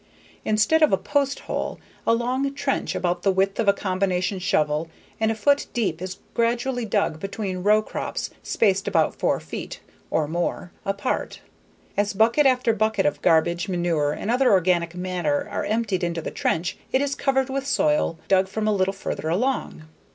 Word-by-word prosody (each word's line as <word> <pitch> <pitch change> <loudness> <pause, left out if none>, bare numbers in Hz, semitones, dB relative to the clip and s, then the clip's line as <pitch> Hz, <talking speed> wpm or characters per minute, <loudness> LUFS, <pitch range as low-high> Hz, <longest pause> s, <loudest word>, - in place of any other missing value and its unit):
Instead 215 +9 +3
of 310 - +5
a 195 - +4
post 280 +2 0
hole, - - -4 0.3
a 230 - +5
long 255 +4 -1
trench 275 -1 -1
about 175 -1 -1
the 195 - +3
width 195 +1 0
of 225 - +1
a - - +8
combination 185 -1 -1
shovel 155 -4 0 0.3
and 220 0 +2
a 225 - 0
foot 280 +7 +2
deep 185 -9 -1
is 185 0 -5 0.2
gradually 240 +1 0
dug 200 -7 0
between 195 -1 -4
row 210 +3 +4
crops - - -4
spaced 195 -2 +1
about - - +2
four - - +1
feet - - -7 0.3
(or 155 -2 +1
more) 175 +2 -2 0.2
apart. 200 +5 -2 0.5
As 205 0 +1
bucket 230 +8 +4
after 250 -3 +3
bucket 215 -2 +1
of 195 - 0
garbage, 170 +4 +2
manure, 170 -5 +1
and 215 - -3
other 250 +1 +3
organic 175 -3 +2
matter 180 -5 -1
are - - -2
emptied 205 -4 0
into 170 -1 -1
the 160 - -5
trench, 170 +3 -1
it 260 - +3
is 280 0 0
covered 265 -1 0
with 275 0 -2
soil 300 - +2
dug 190 0 +3
from 215 +2 -2
a 215 - +3
little 195 -1 +1
further 160 -4 -4
along. 220 -2 -1
200 Hz, 175 wpm, -24 LUFS, 180-235 Hz, 0.5 s, a